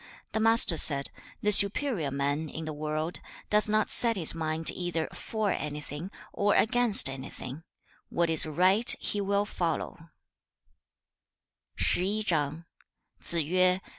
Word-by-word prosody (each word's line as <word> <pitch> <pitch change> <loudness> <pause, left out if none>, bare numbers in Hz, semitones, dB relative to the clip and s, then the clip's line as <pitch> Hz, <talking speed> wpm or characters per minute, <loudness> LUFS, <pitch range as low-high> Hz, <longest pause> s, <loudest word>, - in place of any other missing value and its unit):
The 220 - -3
Master 225 -7 +4
said, 140 -2 +2 0.3
'The 210 - +1
superior 200 - +4
man, 145 +3 -4
in 160 +2 -8
the 155 - -7
world, 155 +2 -5 0.3
does 210 0 +1
not 215 0 0
set 235 -1 0
his 170 -6 +6
mind 160 0 -3
either 175 -3 -4
for 215 -3 -4
anything, 150 +3 -7 0.2
or 205 0 0
against 235 - +5
anything; 135 +1 -9 0.5
what 170 0 -1
is 160 -1 +2
right 185 +9 +1
he 205 - -3
will 200 +1 -1
follow.' 170 -3 -5
170 Hz, 110 wpm, -26 LUFS, 155-210 Hz, 0.5 s, his